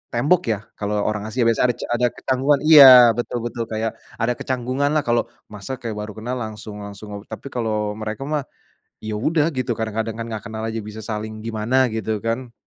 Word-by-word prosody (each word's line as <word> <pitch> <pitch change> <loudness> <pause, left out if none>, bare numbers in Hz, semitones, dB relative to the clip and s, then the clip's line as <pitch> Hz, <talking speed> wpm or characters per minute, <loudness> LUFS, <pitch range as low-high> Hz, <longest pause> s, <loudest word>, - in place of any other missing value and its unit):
tembok 150 +8 +2
ya 110 -3 0 0.2
kalau 105 0 -2
orang 105 0 -2
Asia 120 +3 0
biasanya 115 +2 +3
ada - - -19
ca - - -4
ada 125 +1 +3
kecanggungan, 135 +2 +1
iya, 135 -6 +10
betul 120 -1 -3
betul 120 0 -3
kayak 110 0 -2 0.2
ada 115 +1 0
kecanggungan 130 +2 -1
lah 155 - +2
kalau 120 0 +1 0.2
masa 105 +5 -6
kayak 115 - -4
baru 105 0 -6
kenal 120 +4 -4
langsung 105 -2 -7
langsung, 100 0 -8
tapi 140 - -8
kalau 110 -3 -1
mereka 110 +4 -4
mah, 150 0 -1 0.6
ya 110 - -4
udah 155 +6 +1
gitu 125 -4 -2
kadang-kadang 110 0 -3
kan 115 - -4
gak 110 - -4
kenal 110 -1 -5
aja 115 0 -3
bisa 105 +1 -8
saling 110 0 -5
gimana 115 +2 -1 0.2
gitu 110 0 -2
kan. 115 +2 -2
115 Hz, 195 wpm, -22 LUFS, 110-125 Hz, 0.6 s, iya